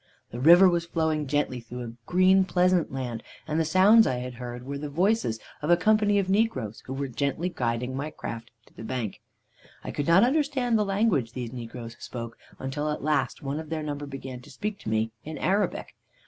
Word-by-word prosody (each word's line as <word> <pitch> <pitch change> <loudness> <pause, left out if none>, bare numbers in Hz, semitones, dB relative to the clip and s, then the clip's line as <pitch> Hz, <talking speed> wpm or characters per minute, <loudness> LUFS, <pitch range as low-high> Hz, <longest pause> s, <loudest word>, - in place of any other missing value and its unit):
"The 120 - -6
river 175 +7 +8
was 170 -1 +1
flowing 160 -3 0
gently 140 -2 0
through 120 +1 -8
a 115 -1 -7
green, 185 +1 +5
pleasant 180 -2 +2
land, 125 -4 -4 0.3
and 155 +1 0
the - - +3
sounds 195 +8 +6
I 130 - 0
had 125 0 -5
heard 120 0 -6
were 140 +1 -4
the 150 0 -5
voices 175 - +1 0.2
of 150 - -3
a 175 - +6
company 210 +1 +3
of 195 -2 +1
negroes 190 - 0
who 130 - -4
were 140 0 -2
gently 140 +7 -1
guiding 125 -3 -2
my 145 +3 -3
raft 115 0 -5 0.2
to - - -24
the - - -11
bank. 115 -2 -4 0.6
"I - - -5
could 145 - -3
not 170 +5 +6
understand 265 -3 +1
the 210 -1 +2
language 195 - +1
these 125 -2 -5
negroes 115 -1 -8
spoke, 115 -1 -7 0.2
until 145 +3 -3
at 150 - -3
last 145 -4 0
one 140 +2 -2
of 160 -1 -8
their 160 -1 -3
number 145 -1 -4
began 135 -2 -7
to 140 - -15
speak 205 +8 -4
to - - -6
me 110 +1 0
in 155 0 -6
Arabic. 200 +3 0
145 Hz, 205 wpm, -27 LUFS, 125-185 Hz, 0.6 s, river